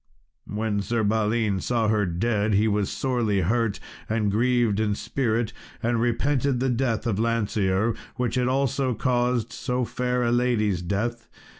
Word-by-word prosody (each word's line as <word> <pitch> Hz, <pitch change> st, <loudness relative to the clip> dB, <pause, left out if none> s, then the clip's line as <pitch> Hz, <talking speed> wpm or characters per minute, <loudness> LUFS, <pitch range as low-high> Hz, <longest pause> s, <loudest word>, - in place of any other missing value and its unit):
When 105 Hz, -1 st, -1 dB
Sir 115 Hz, +2 st, -1 dB
Balin 105 Hz, -1 st, +1 dB
saw 115 Hz, +2 st, 0 dB
her 105 Hz, -2 st, +2 dB
dead 105 Hz, +4 st, 0 dB
he 105 Hz, +2 st, +3 dB
was 105 Hz, -2 st, +1 dB
sorely 120 Hz, -7 st, 0 dB
hurt 115 Hz, +3 st, 0 dB, 0.3 s
and 110 Hz, -2 st, +1 dB
grieved 120 Hz, -1 st, +2 dB
in 105 Hz, -2 st, +1 dB
spirit, 115 Hz, -2 st, -1 dB, 0.3 s
and 115 Hz, 0 st, +1 dB
repented 130 Hz, +2 st, +1 dB
the 130 Hz, +1 st, +1 dB
death 120 Hz, -2 st, 0 dB
of 110 Hz, -4 st, 0 dB
Lancear, 110 Hz, -2 st, +1 dB, 0.2 s
which 125 Hz, -1 st, -1 dB
had 125 Hz, -1 st, +1 dB
also 135 Hz, -1 st, +1 dB
caused 125 Hz, 0 st, 0 dB
so 125 Hz, 0 st, -1 dB
fair 125 Hz, +1 st, -1 dB
a 120 Hz, -, +1 dB
lady's 115 Hz, -7 st, +1 dB
death. 110 Hz, +6 st, -2 dB
115 Hz, 150 wpm, -25 LUFS, 105-125 Hz, 0.3 s, he